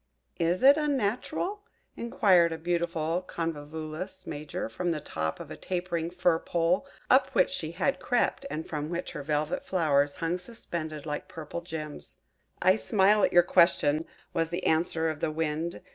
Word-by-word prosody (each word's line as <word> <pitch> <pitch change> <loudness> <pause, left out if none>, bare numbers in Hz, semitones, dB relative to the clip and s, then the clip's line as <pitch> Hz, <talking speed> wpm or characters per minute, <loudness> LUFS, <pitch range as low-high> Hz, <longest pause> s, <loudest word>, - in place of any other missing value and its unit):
"Is 175 +5 +1
it 280 +2 +8
unnatural?" 295 - -1 0.3
inquired 185 -7 +3
a 160 - -3
beautiful 170 0 -1
Convolulus 160 +1 -5
Major, 150 0 -4
from 175 +11 -3
the 160 -2 0
top 80 - -3
of - - -9
a - - -5
tapering 175 -2 -2
fir 175 -2 +2
pole, 175 +10 +1 0.2
up 260 +2 +5
which - - +4
she 165 - -4
had 270 +10 0
crept, 245 +2 +1
and 160 - -4
from 150 -1 -3
which 175 +1 -3
her 150 - -5
velvet 150 +2 -1
flowers 145 -6 +2
hung 175 +1 -1
suspended 170 -7 -6
like 150 -1 -4
purple 160 +1 -6
gems. 155 -3 -7 0.5
"I 185 +2 +5
smile 210 -1 +3
at - - +4
your 175 - +7
question," 165 -3 +3 0.3
was 165 0 0
the 175 +2 -3
answer 160 0 +2
of 155 -2 -2
the - - 0
Wind. 160 +2 -2
170 Hz, 160 wpm, -28 LUFS, 155-185 Hz, 0.5 s, it